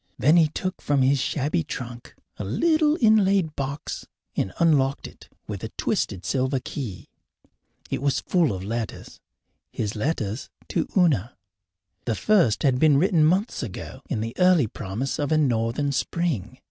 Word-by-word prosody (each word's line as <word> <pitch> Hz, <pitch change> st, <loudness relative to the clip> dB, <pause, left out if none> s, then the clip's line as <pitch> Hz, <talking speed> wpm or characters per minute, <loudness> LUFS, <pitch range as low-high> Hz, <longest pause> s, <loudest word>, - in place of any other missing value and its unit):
Then 150 Hz, +5 st, +4 dB
he 165 Hz, -2 st, +6 dB
took 185 Hz, +5 st, -4 dB
from 140 Hz, -2 st, +2 dB
his 135 Hz, +1 st, +3 dB
shabby 150 Hz, +5 st, 0 dB
trunk 120 Hz, -4 st, -7 dB, 0.2 s
a -, -, -4 dB
little 310 Hz, -, +2 dB
inlaid 200 Hz, -, +3 dB
box 140 Hz, +1 st, -4 dB, 0.3 s
and 95 Hz, -, -1 dB
unlocked 140 Hz, -5 st, +2 dB
it -, -, -16 dB, 0.2 s
with -, -, -6 dB
a -, -, -4 dB
twisted 95 Hz, -, -1 dB
silver 130 Hz, 0 st, 0 dB
key. 120 Hz, -7 st, -6 dB, 0.8 s
It -, -, -1 dB
was 140 Hz, -2 st, +1 dB
full 175 Hz, -6 st, +2 dB
of 95 Hz, -2 st, -4 dB
letters 115 Hz, 0 st, -5 dB, 0.5 s
his 105 Hz, -2 st, -3 dB
letters 110 Hz, -2 st, -2 dB, 0.2 s
to -, -, 0 dB
Una. 140 Hz, -, +2 dB, 0.7 s
The 115 Hz, -, 0 dB
first 175 Hz, -, +3 dB
had 130 Hz, -3 st, +3 dB
been 150 Hz, -2 st, +5 dB
written 170 Hz, 0 st, +3 dB
months 185 Hz, +8 st, +1 dB
ago, 115 Hz, -9 st, -7 dB
in 105 Hz, -, -1 dB
the 115 Hz, +1 st, -4 dB
early 180 Hz, -6 st, +5 dB
promise 110 Hz, +5 st, -4 dB
of 145 Hz, +1 st, -1 dB
a 155 Hz, -, +4 dB
northern 125 Hz, 0 st, +1 dB
spring. 130 Hz, -, -2 dB
140 Hz, 155 wpm, -24 LUFS, 115-165 Hz, 0.8 s, he